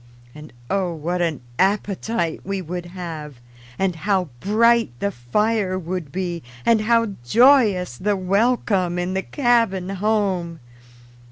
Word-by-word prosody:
And 150 Hz, 0 st, -12 dB, 0.2 s
oh, 185 Hz, -1 st, -1 dB
what 175 Hz, +3 st, -2 dB
an 165 Hz, -6 st, -1 dB, 0.2 s
appetite 195 Hz, -2 st, 0 dB
we 195 Hz, 0 st, -3 dB
would 175 Hz, 0 st, -5 dB
have, 165 Hz, -5 st, -7 dB, 0.4 s
and 190 Hz, -3 st, 0 dB
how 185 Hz, -1 st, 0 dB
bright 230 Hz, -, +3 dB
the 200 Hz, -, -1 dB
fire 195 Hz, -, 0 dB
would 175 Hz, -4 st, -5 dB
be, 175 Hz, -2 st, -3 dB, 0.2 s
and 225 Hz, -2 st, +4 dB
how 230 Hz, -1 st, +2 dB
joyous 205 Hz, -, +4 dB
the 205 Hz, +1 st, 0 dB
welcome 195 Hz, -2 st, +1 dB
in 175 Hz, +1 st, -2 dB
the 190 Hz, -, 0 dB
cabin 230 Hz, -8 st, +1 dB
home! 195 Hz, -4 st, -1 dB
190 Hz, 125 wpm, -22 LUFS, 175-210 Hz, 0.4 s, and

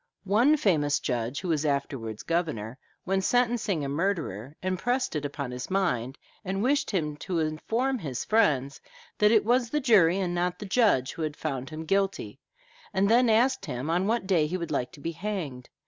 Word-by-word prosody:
One 235 Hz, +10 st, +4 dB
famous 150 Hz, -, +2 dB
judge, 120 Hz, +1 st, -2 dB
who 185 Hz, -, -4 dB
was 155 Hz, -2 st, +1 dB
afterwards 135 Hz, -7 st, -2 dB
governor, 140 Hz, -9 st, -2 dB, 0.2 s
when 190 Hz, +1 st, 0 dB
sentencing 225 Hz, -, +1 dB
a -, -, -2 dB
murderer, 145 Hz, -, -2 dB
impressed 240 Hz, +6 st, -1 dB
it 150 Hz, -1 st, -2 dB
upon 140 Hz, -2 st, -4 dB
his 125 Hz, 0 st, -6 dB
mind, 140 Hz, -10 st, 0 dB, 0.3 s
and 195 Hz, +1 st, -2 dB
wished 280 Hz, +3 st, +1 dB
him 155 Hz, -7 st, -1 dB
to 180 Hz, +2 st, -3 dB
inform 225 Hz, +12 st, -1 dB
his 135 Hz, -, -4 dB
friends, 140 Hz, -, +2 dB, 0.4 s
that 210 Hz, -, +5 dB
it 220 Hz, -3 st, +4 dB
was 240 Hz, +1 st, +2 dB
the 300 Hz, -, 0 dB
jury 200 Hz, -, +4 dB
and 180 Hz, -3 st, -1 dB
not 175 Hz, 0 st, -1 dB
the 210 Hz, -, -7 dB
judge 195 Hz, -, +2 dB
who -, -, -7 dB
had 155 Hz, -2 st, -3 dB
found 135 Hz, -1 st, -4 dB
him 160 Hz, +1 st, -7 dB
guilty, 195 Hz, +2 st, -1 dB, 0.5 s
and 200 Hz, 0 st, +2 dB
then 240 Hz, +1 st, +5 dB
asked 245 Hz, +4 st, +2 dB
him 130 Hz, +6 st, -3 dB
on 180 Hz, +3 st, +1 dB
what 230 Hz, -1 st, 0 dB
day 175 Hz, -6 st, +2 dB
he 180 Hz, +4 st, -2 dB
would 170 Hz, -2 st, -5 dB
like 125 Hz, -, -1 dB
to -, -, -13 dB
be 165 Hz, +4 st, -3 dB
hanged. 165 Hz, -8 st, -5 dB
175 Hz, 190 wpm, -27 LUFS, 145-210 Hz, 0.5 s, that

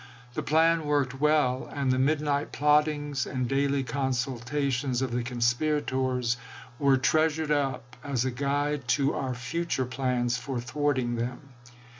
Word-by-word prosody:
The -, -, -2 dB
plan 165 Hz, +1 st, +3 dB
worked 135 Hz, -2 st, 0 dB
well; 150 Hz, -4 st, +2 dB
and 140 Hz, -2 st, 0 dB
the 130 Hz, -, +1 dB
midnight 145 Hz, +1 st, +1 dB
plot 150 Hz, +1 st, +4 dB
tings 145 Hz, -4 st, -3 dB
and 130 Hz, -2 st, -2 dB
daily 140 Hz, +1 st, +1 dB
consultations 130 Hz, +1 st, -1 dB
of 130 Hz, -, -2 dB
the 120 Hz, +1 st, 0 dB
conspirators 125 Hz, 0 st, 0 dB, 0.4 s
were 140 Hz, -2 st, +4 dB
treasured 155 Hz, +2 st, +1 dB
up 135 Hz, -4 st, -1 dB
as 135 Hz, -4 st, -1 dB
a 130 Hz, -, 0 dB
guide 140 Hz, +1 st, -1 dB
to 140 Hz, 0 st, +1 dB
our 130 Hz, -2 st, -2 dB
future 135 Hz, +2 st, -2 dB
plans 125 Hz, -1 st, 0 dB
for 125 Hz, 0 st, -4 dB
thwarting 130 Hz, -1 st, -1 dB
them. 125 Hz, +4 st, -4 dB
135 Hz, 140 wpm, -28 LUFS, 125-145 Hz, 0.4 s, plot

